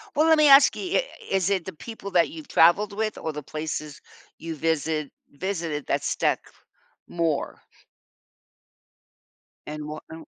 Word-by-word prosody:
Well, 310 +2 +4
let 320 -1 +6
me 305 - +6
ask 275 0 +7
you, 375 +3 0
i - - -3 0.2
is 190 -1 +1
it 190 -4 0
the 190 - -6
people 200 +3 -9
that 175 -2 +3
you've 315 -2 -10
traveled 195 +6 +4
with 215 +1 -2
or 160 - -4
the 150 0 -6
places 155 +1 -5 0.4
you 165 -1 -6
visit 155 -1 -1 0.2
visited 165 -2 -4
that - - 0
stuck - - +1 0.7
more? 165 -4 -1 2.1
And 150 0 -6
what 155 +1 -7
no 160 0 -10
170 Hz, 150 wpm, -25 LUFS, 155-210 Hz, 2.1 s, ask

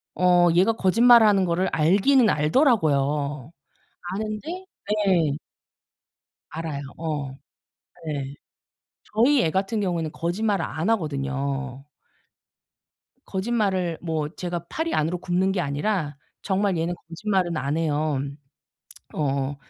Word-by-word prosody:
어 180 -1 +4
얘가 195 +6 +4
거짓말하는 220 -1 +5
거를 180 +2 0
알기는 205 - +4
알더라고요. 150 - +1 0.6
아는데 220 - -5 0.4
예. 160 -6 +2 1.1
알아요. 160 -3 -5 0.2
어. 150 -4 -3 0.8
네. 140 -3 -4 0.8
저희 250 +5 +4
애 160 - +1
같은 195 +3 -1
경우에는 170 -5 -1
거짓말을 200 +5 -1
안 160 +9 -3
하거든요. 140 - -2 1.4
거짓말을 190 -5 -1
뭐 160 -3 -2
제가 175 -2 -4
팔이 325 +1 -2
안으로 165 +3 0
굽는 185 +2 0
게 190 - -1
아니라 150 0 -1 0.3
정말 195 -1 0
얘는 165 +2 -1
거짓말은 180 -1 -1
안 140 +2 -1
해요. 155 -3 0 0.9
어 140 -1 -1
175 Hz, 230 characters per minute, -24 LUFS, 150-200 Hz, 1.4 s, 거짓말하는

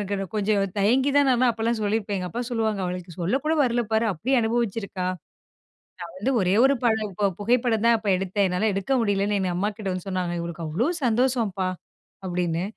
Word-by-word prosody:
எனக்கு 195 0 -3
கொஞ்சம் 205 -1 +1
தயங்கி 245 +8 +3
தான் 285 -1 +4
நான் 250 -1 +3
அப்பல்லாம் 230 0 -1
சொல்லியிருப்பேன். 205 -1 -1
எங்க 180 -1 -4
அப்பா 235 +8 -4
சொல்லுவாங்க, 220 -3 0
"அவளுக்கு 180 0 -5
சொல்ல 175 +8 0
கூட 310 +1 +1
வரல 240 -1 +1
பாரு! 220 +1 +2
அப்பிடி 215 - -2
அனுபவச்சியிருக்கா!" 220 -4 -1 0.9
நான் 170 -1 -8
வந்து 205 +8 0
ஒரே 185 -1 +2
ஒரு 270 +1 +5
படம், 220 -3 +1
இப்ப 200 +2 +1
புகைப்படந்தான் 230 +1 +2
அப்ப 215 -1 -8
எடுத்தேன். 195 +2 0
என்னால 180 +4 0
எடுக்க 195 +6 -3
முடியலன்னு 205 -2 +1
எங்க 185 -2 -1
அம்மாகிட்ட 205 +2 -2
வந்து 185 +1 -6
சொன்னாங்க. 180 -2 -2
இவளுக்கு 170 0 -5
அவ்ளோ 180 - 0 0.2
சந்தோஷம்பா! 230 -5 +1 0.6
அப்பிடின்னு. 175 -2 -1
205 Hz, 175 wpm, -24 LUFS, 185-230 Hz, 0.9 s, ஒரு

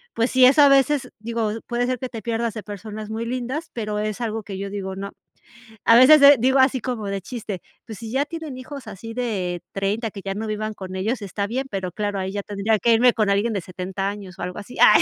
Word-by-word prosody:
pues 230 +2 +1
sí 255 -1 +6
es 260 +3 +6
a 290 -1 +8
veces, 275 0 +3
digo, 225 -1 -2 0.2
puede 240 0 0
ser 255 0 -1
que 255 0 -4
te 225 -4 -8
pierdas 230 -1 -1
de 215 - -5
personas 210 +1 -7
muy 225 +1 -3
lindas, 255 +7 -3
pero, 210 -2 -3
es 215 +1 -3
algo 225 -2 -2
que 195 -2 -7
yo 200 0 -5
digo, 190 -2 -4
no. 200 +1 -6 0.7
A 230 - +7
veces, 280 +4 +8
eh, 280 -1 +9
digo 265 +3 +3
así 260 -1 +4
como 230 -4 -4
de 195 0 -2
chiste, 205 -1 -6 0.2
pues, 220 -3 -8
si 225 -1 -7
ya 270 +3 +2
tienen 310 -4 -7
hijos 260 -1 -9
así 215 +3 -8
de 195 -8 -2
30 205 +4 -1
que 200 -1 -9
ya 195 0 -3
no 220 +2 -4
vivan 215 0 -3
con 190 -2 -8
ellos, 220 +5 -1
está 200 +1 -3
bien, 255 +5 -2
pero 190 -4 -3
claro, 205 +1 -2
ahí 190 0 -2
ya 200 0 -3
tendría 205 +1 0
que 230 +4 +4
irme 245 +2 +6
con 215 -3 +1
alguien 205 +4 +2
de 200 - -1
70 185 +2 -4
años, 200 -3 -7
o - - -6
algo 180 - -4
así. 205 +4 -9
Ay, - - +8
220 Hz, 250 wpm, -23 LUFS, 200-245 Hz, 0.7 s, eh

